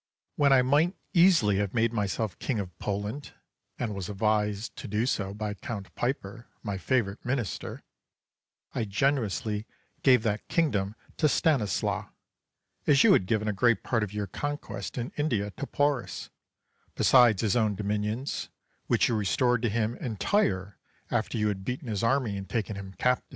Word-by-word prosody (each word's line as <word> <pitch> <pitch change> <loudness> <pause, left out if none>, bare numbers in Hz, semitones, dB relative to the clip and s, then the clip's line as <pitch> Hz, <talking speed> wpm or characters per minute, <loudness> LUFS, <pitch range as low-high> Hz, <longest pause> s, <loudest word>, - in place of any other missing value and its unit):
Charles. - - -54
When 140 -2 +5
I 130 - +6
might 150 +8 +3 0.2
easily 170 - +5
have 100 +1 -1
made 115 0 +2
myself 105 -2 -2
King 130 - -1
of 95 -4 -4
Poland, 105 +7 -4 0.4
and 115 -4 -2
was 100 -1 -5
advised 105 +1 0
to 130 - -6
do 105 +3 0
so 100 -6 -1
by 105 +1 -3
Count 100 -1 -7
Piper, 120 -2 -3 0.2
my 100 -3 -3
favourite 110 -4 0
Minister, 120 -5 -3 0.9
I 115 - -1
generously 110 -2 0 0.3
gave 125 -4 +5
that 105 -2 -1
kingdom 105 - +1 0.2
to 155 - +3
Stanislas, 135 -10 +1 0.8
as 140 -2 +6
you - - +7
had 90 - +3
given 110 0 0
a 105 - +1
great 120 +3 +2
part 120 -3 0
of 105 -2 -2
you 105 -1 -2
conquests 145 - -5
in 120 0 -3
India 115 -9 0
to 140 - -6
Porus, 145 -3 -1 0.6
besides 120 -6 +5
his 105 -1 +2
own 110 -4 +2
dominions, 105 +6 -2 0.4
which - - +3
you - - 0
restored 115 +4 +2
to 120 - +1
him 110 +2 0
entire 100 - 0 0.3
after - - 0
you 105 -1 +2
had 95 -2 -2
beaten 125 +4 -4
his 105 -4 -2
army 115 -4 +1
and 95 0 -7
taken 110 -3 -2
him 95 -1 -8
captive. 125 +4 +1
110 Hz, 165 wpm, -28 LUFS, 100-125 Hz, 0.9 s, you